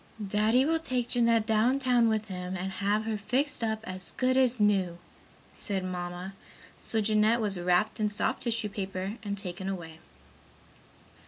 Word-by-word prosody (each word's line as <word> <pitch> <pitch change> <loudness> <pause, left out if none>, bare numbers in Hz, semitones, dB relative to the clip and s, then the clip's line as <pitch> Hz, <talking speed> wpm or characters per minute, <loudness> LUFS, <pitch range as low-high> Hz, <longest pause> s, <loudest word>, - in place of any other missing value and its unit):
"Daddy 215 +6 +3
will 325 +2 +2
take 255 -6 -2
Jeanette 230 -2 +3
down 225 +4 +3
town 250 -3 +3
with 215 -1 0
him 185 -2 -5
and 190 +1 -3
have 200 +3 0
her 220 -1 -2
fixed 250 +5 -1
up 220 -1 -1
as 185 0 -7
good 255 0 +2
as 255 -2 +3
new," 195 -4 +2 0.6
said 195 -3 -3
Mamma, 180 +1 -5 0.4
so 225 - -2
Jeanette 215 +2 +3
was 205 -5 -1
wrapped 180 +5 +1
in 210 -1 +2
soft 205 - -1
tissue 235 -2 -1
paper 195 +1 -4
and 205 -2 -4
taken 190 0 -5
away. 165 -4 -6
210 Hz, 160 wpm, -29 LUFS, 190-230 Hz, 0.6 s, Daddy